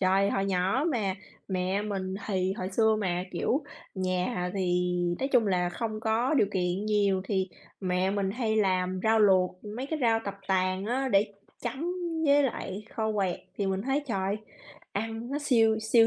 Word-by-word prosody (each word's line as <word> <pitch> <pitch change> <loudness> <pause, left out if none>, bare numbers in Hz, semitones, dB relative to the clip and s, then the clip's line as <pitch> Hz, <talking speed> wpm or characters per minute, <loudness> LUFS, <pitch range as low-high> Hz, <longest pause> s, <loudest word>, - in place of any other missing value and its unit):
trời, 195 +1 +3
hồi 195 - 0
nhỏ 195 +8 +1
mà 205 -6 0 0.3
mẹ 185 +2 0
mình 190 -3 -3
thì 190 -2 0
hồi 185 -2 -4
xưa 220 +2 +3
mà, 180 -2 -1
kiểu, 265 - 0 0.3
nhà 185 0 -1
thì 180 -2 +1 0.3
nói 270 - -1
chung 250 -5 +4
là 180 -2 +2
không 215 +4 -4
có 225 +5 +1
điều 240 - +4
kiện 180 +1 0
nhiều, 200 -3 +2
thì 190 -2 0 0.3
mẹ 185 0 +1
mình 195 -1 0
hay 220 0 0
làm 185 -2 +1
rau 220 0 +4
luộc, 185 -2 +3
mấy 260 +3 -3
cái 315 +1 -2
rau 225 -2 +4
tập 200 - -3
tàng 185 0 +1
á, 265 +3 0
để 205 -2 +3 0.3
chấm 265 +7 -3 0.4
với 285 0 +6
lại 215 -6 -3
kho 220 -1 0
quẹt 195 -4 0 0.2
thì 200 - 0
mình 190 0 -1
thấy, 270 +4 0
trời, 195 -3 -1 0.6
ăn 225 +3 -3
nó 285 - -1
siêu, 225 -6 +3
siêu 225 +1 +5
200 Hz, 180 wpm, -28 LUFS, 185-225 Hz, 0.6 s, với